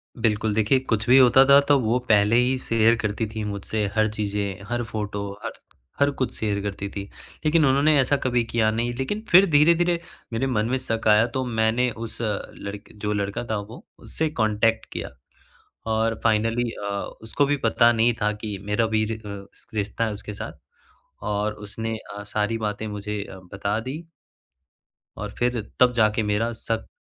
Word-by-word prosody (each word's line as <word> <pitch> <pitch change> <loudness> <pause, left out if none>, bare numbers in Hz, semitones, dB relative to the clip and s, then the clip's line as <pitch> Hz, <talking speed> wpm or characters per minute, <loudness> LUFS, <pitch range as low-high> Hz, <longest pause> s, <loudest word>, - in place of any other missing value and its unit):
बिल्कुल। 110 -2 0
देखिए, 110 +5 +3
कुछ 115 -4 -1
भी 130 - +8
होता 130 0 +7
था 140 +1 +8
तो 145 -1 +6
वो 115 0 +1
पहले 105 +1 +5
ही 125 +2 +3
शेयर 115 -2 +3
करती 105 +1 -1
थी 110 0 -5
मुझसे, 105 +1 -2
हर 110 0 +3
चीज़ें, 100 -2 -3
हर 120 0 -1
फोटो, 105 -2 -4
हर - - -3 0.5
हर 140 0 +4
कुछ 130 - -1
शेयर 105 -2 -1
करती 100 0 -4
थी। 100 0 -5 0.4
लेकिन 155 +1 +4
उन्होंने 140 +3 +4
ऐसा 135 +2 +3
कभी 125 -2 +2
किया 115 -1 +1
नहीं। 120 +2 -1
लेकिन 135 - -2
फिर 185 +3 +8
धीरे-धीरे 170 +3 +4 0.3
मेरे 115 +4 0
मन 110 -5 0
में 130 - +1
शक 115 -4 -2
आया 105 +1 +6
तो 130 +2 -2
मैंने 115 +1 +1
उस 115 0 -7
लड़क 105 -1 -5
जो 105 0 0
लड़का 100 +2 -2
था 110 - +1
वो 115 - -11
उससे 160 0 -2
कॉन्टैक्ट 110 -3 +1
किया - - -4 0.8
और 110 0 0
फाइनली 115 +2 +2
अ, 105 - -8 0.4
उसको 110 +6 +1
भी 145 +1 +1
पता 115 +1 +4
नहीं 115 +1 +3
था 105 - +3
कि 105 -1 -5
मेरा 105 +3 +1
भी 110 0 +1
रि 110 +1 -3
अ, 100 -2 -8 0.3
रिश्ता 105 +2 -1
है 110 - -1
उसके 105 0 -7
साथ। - - -7 0.7
और 105 +1 -1
उसने 105 +2 -5
अ, 105 -1 -9
सारी 105 +2 -1
बातें 110 0 -3
मुझे 105 0 -4
अ, 95 - -11
बता 100 +2 -1
दी। 140 +8 -6 1.1
और 105 +1 -5
फिर 120 -1 0 0.2
तब 125 -1 +5
जाके 110 0 +3
मेरा 105 +3 0
शक 115 -1 -2
110 Hz, 180 wpm, -24 LUFS, 105-120 Hz, 1.1 s, भी